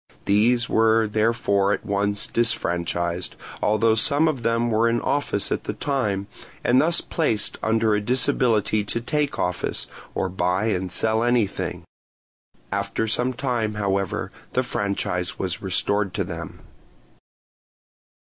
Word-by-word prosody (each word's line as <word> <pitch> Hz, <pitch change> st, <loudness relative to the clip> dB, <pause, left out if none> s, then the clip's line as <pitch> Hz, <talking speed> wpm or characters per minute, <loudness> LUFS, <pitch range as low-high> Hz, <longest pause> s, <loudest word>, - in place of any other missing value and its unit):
These 120 Hz, +4 st, +3 dB
were 110 Hz, 0 st, +3 dB
therefore 105 Hz, -2 st, +1 dB
at -, -, -4 dB
once 100 Hz, 0 st, 0 dB
disfranchised, 85 Hz, -6 st, -1 dB, 0.3 s
although 110 Hz, +1 st, +3 dB
some 140 Hz, +8 st, +3 dB
of 145 Hz, -6 st, -1 dB
them 115 Hz, +1 st, +1 dB
were 115 Hz, +2 st, +3 dB
in 120 Hz, 0 st, +1 dB
office 140 Hz, -8 st, 0 dB
at -, -, -2 dB
the -, -, -3 dB
time, 105 Hz, -9 st, -1 dB, 0.4 s
and 125 Hz, +1 st, +4 dB
thus 170 Hz, +2 st, +3 dB
placed 115 Hz, -11 st, 0 dB
under 110 Hz, -1 st, +2 dB
a 105 Hz, -, +1 dB
disability 120 Hz, -3 st, +2 dB
to 105 Hz, -, -1 dB
take 145 Hz, +4 st, -1 dB
office, 90 Hz, 0 st, -1 dB, 0.3 s
or -, -, 0 dB
buy 90 Hz, +2 st, 0 dB
and 95 Hz, -3 st, -2 dB
sell 110 Hz, +3 st, +2 dB
anything. 120 Hz, -4 st, 0 dB, 0.9 s
After 100 Hz, +2 st, -1 dB
some 125 Hz, +4 st, +1 dB
time, 120 Hz, -5 st, -2 dB
however, 100 Hz, -2 st, -1 dB, 0.2 s
the 130 Hz, -, +1 dB
franchise 100 Hz, -5 st, -2 dB
was 90 Hz, -3 st, -3 dB
restored 100 Hz, +1 st, 0 dB
to 95 Hz, -, 0 dB
them. 85 Hz, -3 st, -7 dB
110 Hz, 130 wpm, -23 LUFS, 100-120 Hz, 0.9 s, and